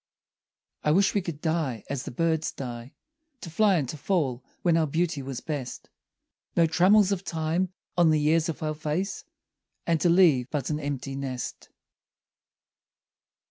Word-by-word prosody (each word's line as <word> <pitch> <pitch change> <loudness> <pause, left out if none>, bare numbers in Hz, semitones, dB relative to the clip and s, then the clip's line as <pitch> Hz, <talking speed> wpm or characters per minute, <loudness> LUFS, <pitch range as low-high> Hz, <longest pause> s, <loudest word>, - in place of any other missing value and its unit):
I - - +2
wish 195 +3 +3
we 205 - +1
could 165 -4 -6
die 155 -9 -1
as 140 -3 -3
the - - -6
birds 160 +4 0
die, 120 -1 -7 0.5
To 170 - -8
fly 205 +3 +4
and 145 -6 0
to 155 - -5
fall 140 -7 -1 0.2
when 170 -2 +4
our 160 -1 +2
beauty 160 -1 -1
was 130 -2 -5
best: 140 -5 -5 0.7
No 170 - +6
trammels 185 +5 +4
of 195 -1 -1
time 165 +2 -1 0.2
on 175 -2 +5
the 155 -1 +3
years 160 +2 +2
of 160 - -4
our 155 0 -1
face; 155 +6 -3 0.6
And 165 -3 +1
to 175 - +4
leave 160 -8 +5
but 145 -2 -2
an 150 - -1
empty 135 -2 -4
nest. 130 -2 -5
155 Hz, 160 wpm, -27 LUFS, 140-170 Hz, 0.7 s, No